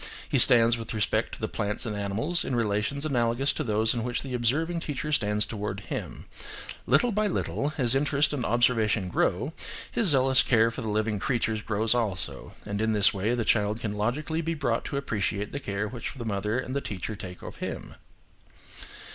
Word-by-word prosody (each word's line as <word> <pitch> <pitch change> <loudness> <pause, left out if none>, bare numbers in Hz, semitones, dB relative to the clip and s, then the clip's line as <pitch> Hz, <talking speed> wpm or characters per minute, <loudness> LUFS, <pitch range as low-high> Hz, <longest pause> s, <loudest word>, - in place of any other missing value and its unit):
He - - +1
stands 115 0 +8
with 115 0 -6
respect 105 -2 0
to - - -16
the - - -2
plants 105 +4 -3
and 110 -2 -3
animals 105 - 0
in 130 - -2
relations 115 +6 -1
analogous 125 -1 +1
to 155 - -3
those 110 -2 +3
in 120 -2 -2
which 120 0 -2
the 135 -2 -6
observing 150 +9 0
teacher 150 -1 -4
stands 105 -6 +2
towards 105 -2 -5
him. - - -6 0.6
Little 245 - +3
by 210 0 +1
little, 150 -6 -2
as 125 -4 +2
interest 145 +2 +2
and 135 -5 -2
observation 115 -4 +2
grow, - - 0 0.4
his 225 - +1
zealous 130 -4 +5
care 115 -1 +3
for 120 - -6
the 110 - -3
living 105 0 0
creatures 110 -2 -1
grows 110 +1 +1
also, 110 -7 -3
and 100 0 -3
in 110 0 +1
this 105 -2 +7
way, 105 +5 0
the 115 -2 -2
child 105 0 +1
can 105 -3 -3
logically 135 +10 -1
be 165 0 -2
brought 120 -6 -1
to 140 - -3
appreciate 105 -6 -2
the 140 - -4
care 100 -4 -3
which 120 +4 -6
the 120 -3 -6
mother 105 +1 -1
and 130 +1 -4
the 140 - 0
teacher 105 0 -5
take 90 -3 -9
of - - -8
him. - - -6
115 Hz, 195 wpm, -27 LUFS, 105-135 Hz, 0.6 s, stands